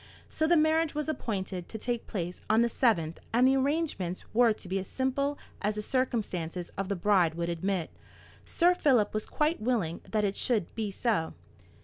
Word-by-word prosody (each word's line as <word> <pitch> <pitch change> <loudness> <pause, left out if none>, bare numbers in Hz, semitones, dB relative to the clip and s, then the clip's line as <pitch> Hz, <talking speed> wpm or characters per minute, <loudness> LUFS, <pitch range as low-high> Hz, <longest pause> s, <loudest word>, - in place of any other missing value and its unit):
So 315 - +1
the 345 +1 +5
marriage 315 0 +2
was 300 0 -2
appointed 190 - -3
to 220 - -5
take 240 +1 -3
place 180 -3 -4
on 220 +2 +5
the - - +3
7th, 185 -10 +1
and 245 +3 +4
the 265 - +4
arrangements 270 - -1
were 235 0 +5
to 210 - -6
be 190 +2 -1
as 190 - -6
simple 275 +2 -1 0.2
as 210 +1 0
the 210 - -3
circumstances 190 -10 -2
of 195 0 -3
the 200 - 0
bride 180 -3 +3
would 170 0 -2
admit. 175 0 -2 0.5
Sir 350 +1 +3
Philip 255 - +3
was 215 0 -2
quite 305 -1 0
willing 215 -9 0
that 215 -1 +1
it 195 0 -1
should 220 -8 0
be 220 -2 -2
so. 200 -5 -1
215 Hz, 190 wpm, -29 LUFS, 185-265 Hz, 0.5 s, the